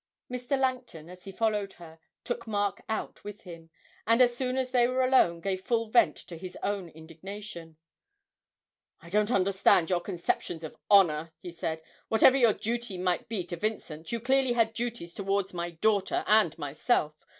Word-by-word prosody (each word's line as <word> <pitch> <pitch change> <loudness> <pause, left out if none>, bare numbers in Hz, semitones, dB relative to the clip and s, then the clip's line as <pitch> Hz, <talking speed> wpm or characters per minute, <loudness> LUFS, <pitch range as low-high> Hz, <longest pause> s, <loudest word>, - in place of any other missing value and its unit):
Mr. 250 +2 -2
Langton, 250 -11 -2
as 180 0 -14
he 195 - -7
followed 210 -1 -1
her, 165 -2 -14 0.2
took 240 -1 -4
Mark 205 -2 -1
out 220 - -4
with 205 0 -8
him, 165 -3 -11 0.4
and 230 +2 +4
as 245 -1 +5
soon 255 +1 -2
as 255 -1 -1
they 245 -2 +4
were 255 +1 +1
alone 215 -10 +4
gave 190 +1 -2
full 230 -2 -1
vent 235 0 +4
to 170 - -10
his 185 0 -8
own 200 -4 -2
indignation. 165 +1 -10 1.2
'I 170 - -13
don't 210 +1 +2
understand 190 -5 +3
your 175 -1 +2
conceptions 175 -2 -3
of 160 - -7
honour,' 165 -5 +4
he 175 +2 -9
said. 160 -1 -4 0.2
'Whatever 240 +4 +5
your 235 -5 +5
duty 230 -2 -3
might 180 +1 -1
be 215 -5 -2
to 175 0 -6
Vincent, 165 -5 -4
you 235 - -1
clearly 260 +1 +2
had 225 -2 +2
duties 230 -7 -4
towards 195 -1 -1
my 175 0 -3
daughter 195 +4 0
and 210 -7 +3
myself. 150 - 0
200 Hz, 170 wpm, -28 LUFS, 170-235 Hz, 1.2 s, as